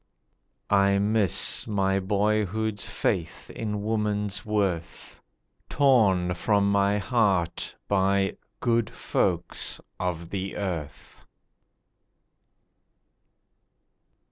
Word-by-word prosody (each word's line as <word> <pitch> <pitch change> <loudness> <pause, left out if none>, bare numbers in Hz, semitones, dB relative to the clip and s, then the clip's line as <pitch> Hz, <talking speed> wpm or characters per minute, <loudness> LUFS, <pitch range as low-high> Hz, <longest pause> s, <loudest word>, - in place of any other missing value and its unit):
I 100 0 +4
miss 100 -2 +3
my 95 -2 +1
boyhood's 105 +1 -1
faith 85 -2 -3
in 105 -2 -4
woman's 105 -2 -1
worth— 100 -6 -3 0.5
Torn 100 -10 +3
from 100 +2 +1
my 100 0 +2
heart, 100 -5 0
by 95 0 +1 0.3
'good 115 -2 +1
folks' - - -1 0.2
of 85 -2 -3
the 95 -1 -4
earth. 85 -7 -6
100 Hz, 75 wpm, -26 LUFS, 95-105 Hz, 0.5 s, I